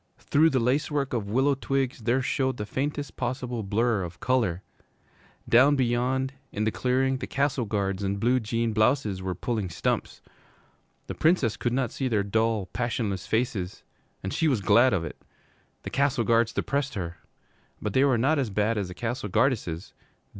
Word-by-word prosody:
Through 155 +3 +3
the 135 -4 +1
lace 130 +5 +1
work 140 -3 -1
of 105 -4 -2
willow 135 +6 +3
twigs 135 -1 -1
there 125 +3 +2
showed 130 -1 0
the 105 - -3
faintest 145 +5 -3
possible 125 -1 -3
blur 110 +2 +1
of 85 -1 -7
color. 115 -9 0 0.8
Down 130 +5 +6
beyond, 130 +1 0 0.2
in 105 - -2
the 110 - +1
clearing, 130 +2 +1
the - - -5
Castle 140 -3 0
Guards 100 -2 -1
in 100 0 -1
blue 120 +5 +2
jean 115 0 -1
blouses 110 -3 +1
were 95 -1 -3
pulling 105 0 -2
stumps. 85 - -2 0.9
The - - -5
Princess 155 - +2
could 120 - -1
not 125 -2 0
see 135 - -2
their 110 -5 +1
dull, 110 0 +1
passionless 110 -5 -2
faces, 110 -5 -1 0.4
and 95 - -3
she 160 - +1
was 130 -8 +1
glad 120 +6 +5
of 95 -6 0
it. 75 - -9 0.6
The - - -6
Castle 140 -3 +1
Guards 115 0 +3
depressed 140 -2 -2
her. 85 -3 -4 0.6
But 105 -2 -3
they 130 - +4
were 135 -4 +3
not 140 +6 +2
as 130 -5 0
bad 105 +2 0
as 100 - -2
the 90 - -9
Castle 115 -1 -3
Guardesses. 105 - 0
120 Hz, 175 wpm, -27 LUFS, 105-130 Hz, 0.9 s, Down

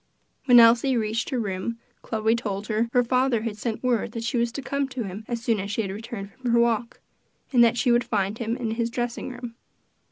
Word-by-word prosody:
When 245 -2 +8
Elsie 240 +3 +5
reached 220 +1 -1
her 260 - -1
room, 200 +2 -3 0.2
Chloe 220 0 0
told 205 -3 -3
her 225 +2 0
her 245 0 +3
father 250 -2 +1
had 225 -2 -3
sent 225 +2 -4
word 235 -3 0
that 230 - -4
she 240 +2 -2
was 235 0 +1
to 280 - -4
come 280 0 -1
to 255 -2 -4
him 195 +2 -7
as 235 -1 -4
soon 230 -4 +1
as 200 +1 -4
she 210 +1 -1
returned 205 -1 -7
from 255 +2 -5
her 235 0 +4
walk, 235 0 0 0.5
and 240 -2 +7
that 235 +1 +3
she 245 0 +2
would 240 0 +3
find 205 -1 -1
him 230 +1 -2
in 235 -4 -3
his 230 +1 -1
dressing 240 0 -3
room. 245 -2 -8
235 Hz, 225 wpm, -25 LUFS, 220-245 Hz, 0.5 s, When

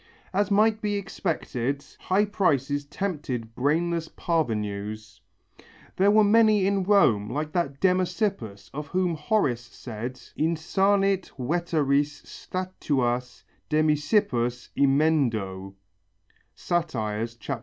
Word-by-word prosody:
As 200 +1 +1
might 215 +2 +3
be 210 -1 -1
expected, 145 -9 -3
high 195 +3 +2
prices 145 -8 0
tempted 140 - -4
brainless 165 +6 0
parvenus. 105 - -3 0.8
There 195 +2 +4
were 215 +1 +6
many 215 -1 +5
in 200 0 +1
Rome 135 - +3
like 150 +1 -3
that 140 -6 -1
Demasippus 185 - 0
of 150 +1 -5
whom 180 +1 0
Horace 150 - 0
said, 120 +1 -7 0.2
"Insanit 190 +4 +1
veteres 145 -1 0
statuas 130 -10 -3 0.3
Demasippus 150 - +1
emendo" 120 -10 +1 0.8
(_Sat. 115 -9 -2
150 Hz, 90 wpm, -26 LUFS, 120-185 Hz, 0.8 s, were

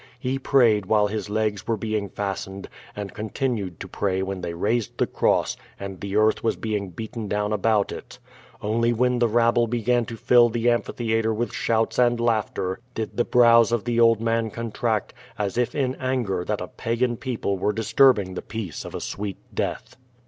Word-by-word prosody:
He 130 +1 -2
prayed 115 -8 +3
while 105 0 +4
his 105 -1 -3
legs 105 -2 -1
were 115 - +1
being 105 -1 -2
fastened, 95 -1 -5 0.3
and 100 -1 -6
continued 105 - -3
to - - -5
pray 95 -2 -1
when 95 -1 -4
they 85 -1 -4
raised 105 +4 -1
the - - +2
cross - - +1 0.2
and 95 -2 -7
the 100 0 -4
earth 110 +1 +3
was 115 - +1
being 105 -3 -3
beaten 110 +4 -6
down 105 +1 -1
about 105 0 +2
it. - - -9 0.5
Only 115 +3 +1
when 125 +1 +1
the 120 - +4
rabble 120 +1 +3
began 120 +1 +1
to 115 - -7
fill 120 +1 +5
the 120 +1 +1
amphitheatre 115 -1 0
with 120 +2 -2
shouts 115 +1 0
and 120 -1 +3
laughter 110 -5 0 0.2
did 110 -1 -4
the 120 - +2
brows 115 -1 +5
of 120 -3 0
the 120 -1 0
old 115 -2 +5
man 115 0 0
contract, 115 -1 -2 0.2
as 100 -2 -2
if 120 0 0
in 130 -3 0
anger 125 -9 -1
that - - -2
a - - -4
pagan 120 +1 -1
people 115 -6 -3
were, 105 - +1
disturbing 110 -2 +3
the - - -4
peace 105 -6 -6
of - - -8
a - - -4
sweet 100 -2 -4 0.2
death. - - -3
110 Hz, 185 wpm, -24 LUFS, 105-120 Hz, 0.5 s, fill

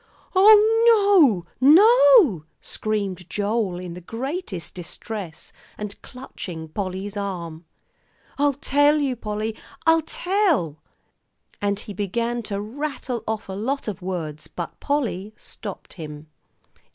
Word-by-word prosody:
"Oh, 415 - +6 0.2
no 270 +3 +7
no!" 440 - +6
screamed 195 -5 -3
Joel, 205 -3 -1
in 180 -1 -7
the 180 - -9
greatest 230 - -5
distress, 180 0 -8 0.2
and 210 -1 -7
clutching 175 -10 -8
Polly's 195 +3 -4
arm. 175 -5 -5 0.7
"I'll 285 -1 +3
tell 290 +2 +3
you, 275 -4 0
Polly; 215 -1 -4 0.3
I'll 325 0 +5
tell." 320 - 0 0.8
And 205 0 0
he 210 - -8
began 230 +5 -2
to 200 -1 -2
rattle 255 +1 -4
off 220 -1 -3
a 190 - -6
lot 245 +8 -3
of 200 -2 -4
words, 165 -5 -5
but 175 - -7
Polly 220 -8 -2
stopped - - -9
him. 150 -3 -9
215 Hz, 115 wpm, -23 LUFS, 185-290 Hz, 0.8 s, no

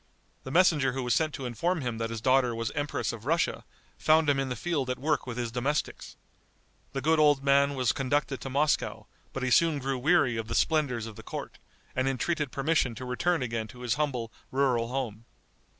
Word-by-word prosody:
The - - -5
messenger 150 -5 +4
who 130 0 -3
was 125 -1 +1
sent 155 +5 +1
to 135 - -6
inform 160 +9 -1
him 120 -3 -3
that 115 0 -2
his 115 -1 -5
daughter 130 -1 +3
was 115 0 -2
Empress 145 -4 -2
of 115 +2 -9
Russia, 165 +2 +1 0.4
found 155 0 +4
him 135 - 0
in 135 -1 -1
the 125 - -2
field 140 0 -2
at 125 - -1
work 150 0 -1
with 120 -1 -5
his 120 -2 -2
domestics. 130 +5 -2 0.8
The 135 - -2
good 160 +3 +3
old 145 -2 +4
man 140 0 +3
was 125 -3 +2
conducted 135 0 -1
to 135 - -5
Moscow; 145 +3 0 0.3
but 135 - -4
he 130 - 0
soon 165 +3 +4
grew 135 -1 -2
weary 140 -4 +3
of 110 -1 -4
the 115 - -3
splendors 140 -8 +1
of 110 -2 -9
the - - -8
court, - - -7 0.4
and 130 +1 +1
entreated 145 +2 -1
permission 140 -4 +1
to 130 - -7
return 135 +5 0
again 115 -2 -3
to 125 +3 -13
his 120 -3 0
humble 125 -5 -2 0.2
rural 130 -4 +1
home. 115 -4 -4
135 Hz, 210 wpm, -28 LUFS, 120-150 Hz, 0.8 s, messenger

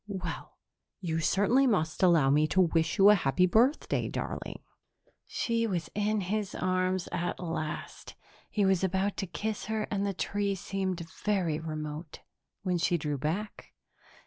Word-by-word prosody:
"Well, 185 -6 -6 0.4
you 165 -3 -2
certainly 205 +11 +3
must 160 -9 0
allow 165 -7 +5
me 150 +2 +4
to 190 - +3
wish 165 -1 +1
you 200 +1 +8
a - - +8
happy 175 -2 +2
birthday, 235 - +2
darling." - - -5 0.6
She 230 -1 0
was 175 -5 -3
in 210 0 0
his 200 +2 -2
arms 185 0 0
at 175 +1 -2
last; 165 -3 -5 0.3
he 205 -2 +1
was 190 -1 +2
about 190 +2 0
to 195 - -2
kiss 205 +6 -4
her, 220 0 -1
and 200 -1 0
the 200 -1 -1
tree 200 +1 -1
seemed 185 -2 -3 0.2
very 180 -7 +1
remote, 155 0 -6 0.4
when 180 -2 0
she 170 +1 +2
drew 150 -3 -3
back. 180 +9 -4
185 Hz, 150 wpm, -29 LUFS, 165-205 Hz, 0.6 s, you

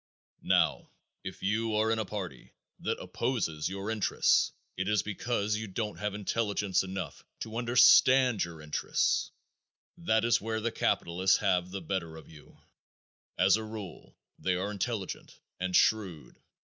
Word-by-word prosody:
Now, - - +1 0.3
if - - -8
you 110 +2 0
are 110 +1 +2
in 115 - +1
a 110 - -1
party 95 - -7 0.3
that - - -2
opposes 90 - -2
your 100 +3 -4
interests 110 -3 +2 0.2
it 95 +2 -2
is 105 -3 +2
because 105 0 -1
you 110 0 -5
don't 105 +2 -4
have 105 -1 -2
intelligence 105 -2 0
enough 95 0 -6 0.2
to 110 0 -6
understand 125 0 +5
your 80 -2 -8
interests. 75 -1 0 0.7
That 115 -10 +1
is 120 - +3
where 110 +1 -2
the 115 +1 -2
capitalists 95 0 +1
have 90 -3 +1
the 95 +1 -5
better 85 -2 -4
of 80 - -13
you. 75 -2 -16 0.8
As 95 +2 +5
a 110 - -5
rule, 110 -4 -9 0.2
they 95 -1 0
are 95 +3 -2
intelligent, 105 -1 -4 0.2
and 90 0 -1
shrewd. 90 - +1
105 Hz, 145 wpm, -30 LUFS, 95-110 Hz, 0.8 s, understand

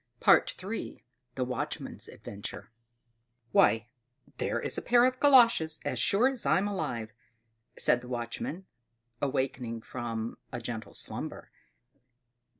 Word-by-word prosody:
III. 200 +5 +2 0.3
The 130 - 0
Watchman's 125 -1 -3
Adventure 105 +3 -8 0.8
"Why, 115 +2 +4 0.5
there - - 0
is - - 0
a - - +1
pair 240 0 +5
of 255 0 +1
galoshes, 235 - +5
as - - -1
sure 220 +6 +4
as 265 -3 -1
I'm 195 +2 +3
alive!" 120 - -3 0.6
said 125 - +4
the 125 - -11
watchman, 125 +9 -4 0.6
awaking 130 -4 -2
from 115 -1 -5
a 120 - -4
gentle 115 -1 -6
slumber. - - -5
130 Hz, 115 wpm, -30 LUFS, -, 0.8 s, pair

